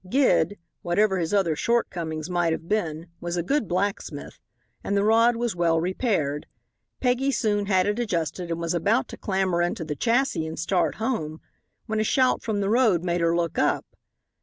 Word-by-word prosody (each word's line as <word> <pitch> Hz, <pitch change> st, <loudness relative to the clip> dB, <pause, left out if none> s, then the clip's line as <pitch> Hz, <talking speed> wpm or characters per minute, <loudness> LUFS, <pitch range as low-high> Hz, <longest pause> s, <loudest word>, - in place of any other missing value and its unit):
Gid, 255 Hz, -5 st, +3 dB, 0.2 s
whatever 190 Hz, +2 st, +2 dB
his 165 Hz, -2 st, -2 dB
other 190 Hz, -6 st, +2 dB
shortcomings 165 Hz, -8 st, -1 dB
might 175 Hz, -2 st, +1 dB
have 165 Hz, +1 st, -6 dB
been, 165 Hz, -6 st, -1 dB
was 175 Hz, 0 st, -3 dB
a 170 Hz, -, 0 dB
good 250 Hz, -, 0 dB
blacksmith, 200 Hz, +4 st, -3 dB, 0.4 s
and 200 Hz, -, 0 dB
the 200 Hz, -, +2 dB
rod 230 Hz, +3 st, +4 dB
was 235 Hz, -4 st, -2 dB
well 165 Hz, -2 st, +2 dB
repaired. 170 Hz, -, -1 dB, 0.5 s
Peggy 255 Hz, +2 st, +1 dB
soon 210 Hz, -6 st, 0 dB
had 185 Hz, -2 st, +3 dB
it 205 Hz, +3 st, -1 dB
adjusted, 175 Hz, -, -2 dB
and 165 Hz, 0 st, -2 dB
was 170 Hz, 0 st, -1 dB
about 205 Hz, +8 st, +1 dB
to -, -, -7 dB
clamber 190 Hz, -3 st, 0 dB
into 175 Hz, -1 st, -1 dB
the 150 Hz, -1 st, -3 dB
chassis 235 Hz, -, +1 dB
and 160 Hz, -, -6 dB
start 175 Hz, +1 st, 0 dB
home 190 Hz, -10 st, -2 dB, 0.5 s
when 220 Hz, -1 st, -2 dB
a -, -, +2 dB
shout 255 Hz, +3 st, +2 dB
from 215 Hz, -3 st, -2 dB
the 195 Hz, -, 0 dB
road 220 Hz, -8 st, +3 dB
made 175 Hz, -1 st, 0 dB
her 170 Hz, 0 st, +2 dB
look 170 Hz, -2 st, -1 dB
up. -, -, +1 dB
185 Hz, 185 wpm, -25 LUFS, 170-220 Hz, 0.5 s, rod